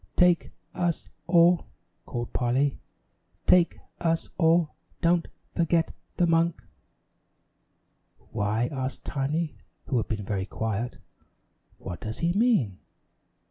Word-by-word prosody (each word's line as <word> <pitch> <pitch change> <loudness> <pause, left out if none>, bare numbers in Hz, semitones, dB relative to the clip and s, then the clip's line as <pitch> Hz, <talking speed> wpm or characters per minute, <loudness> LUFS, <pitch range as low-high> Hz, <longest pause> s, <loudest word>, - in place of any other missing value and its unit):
"Take 180 -1 +4 0.2
us 175 -2 -1 0.2
all," 170 0 +5 0.4
called 120 -1 -4
Polly, 130 +3 +1 0.7
"Take 175 -1 +5 0.2
us 165 -1 0
all 165 -1 +4 0.3
don't 170 -1 +3 0.2
forget 165 0 +1 0.2
the 175 - +4
monk." 165 0 +2 1.7
"Why," 110 +2 0
asked 130 -1 -4
Tiny, 150 +4 -1 0.3
who 130 - +1
had 115 - 0
been 105 -2 -3
very 95 -1 -2
quiet, 110 +3 -2 0.8
"what 85 - -7
does 110 0 -5
he 170 +1 +1
mean?" 200 - +2
155 Hz, 105 wpm, -27 LUFS, 120-170 Hz, 1.7 s, all